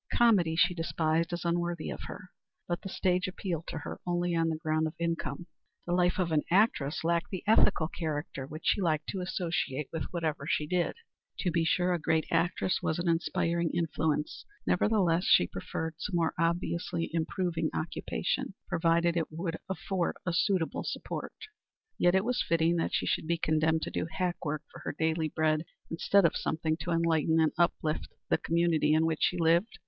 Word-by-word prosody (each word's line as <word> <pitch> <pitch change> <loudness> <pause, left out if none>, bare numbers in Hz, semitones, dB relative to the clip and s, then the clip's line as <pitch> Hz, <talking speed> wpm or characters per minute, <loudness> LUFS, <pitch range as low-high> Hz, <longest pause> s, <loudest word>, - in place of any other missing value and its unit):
Comedy 195 -9 +4
she 175 +2 +4
despised 165 0 0
as 175 0 -4
unworthy 170 -1 -1
of - - -6
her. 185 - -9 0.4
But 175 0 -2
the 195 - -6
stage 185 0 +1
appealed 180 -3 -4
to - - -4
her 155 - -6
only 175 0 0
on 165 0 +2
the 160 - 0
ground 155 -1 0
of 155 - -7
income. 170 -1 -2 0.4
The 175 - -1
life 180 0 +2
of 180 -3 0
an 155 -1 +3
actress 170 -8 +2
lacked 170 0 +1
the 185 - -5
ethical 210 -6 +4
character 145 -5 -4
which 155 +2 -8
she 205 - +3
liked 155 -4 +1
to 190 - -3
associate 165 -6 -2
with 160 - -2
whatever 160 -5 -3
she 150 - +1
did. 175 +2 0 0.5
To 180 - +1
be 165 0 +2
sure, 180 +2 +2
a 175 - 0
great 160 +1 +1
actress 180 +1 +1
was 160 - 0
an 175 0 -2
inspiring 170 0 +1
influence. 160 -2 -1 0.2
Nevertheless 180 -3 +2
she - - +6
preferred 155 - -4
some 185 +2 -3
more 165 -2 +1
obviously 170 0 -1
improving 165 0 -1
occupation, 170 +3 -2
provided 170 +1 +2
it 165 -2 0
would 165 +1 -3
afford 190 -2 -1
a 180 - 0
suitable 175 -1 +1
support. - - -5 0.6
Yet 175 +2 +5
was 250 +1 +1
it - - -2
fitting 165 0 +3
that 165 - 0
she - - 0
should - - -1
be 170 +1 +1
condemned 160 0 +1
to - - -4
do - - -2
hack 180 -2 -2
work 155 -1 -2
for - - -11
her - - -5
daily 160 0 +1
bread 155 0 +1 0.3
instead 190 +3 +3
of 165 - +3
something 160 0 -1
to 175 - -6
enlighten 165 -1 +2
and 160 -1 +3
uplift 160 -2 0 0.2
the - - +3
community 165 -2 +2
in 160 +1 +3
which 160 -1 -1
she 180 - +2
lived? 170 +5 +2
165 Hz, 185 wpm, -30 LUFS, 160-175 Hz, 0.6 s, she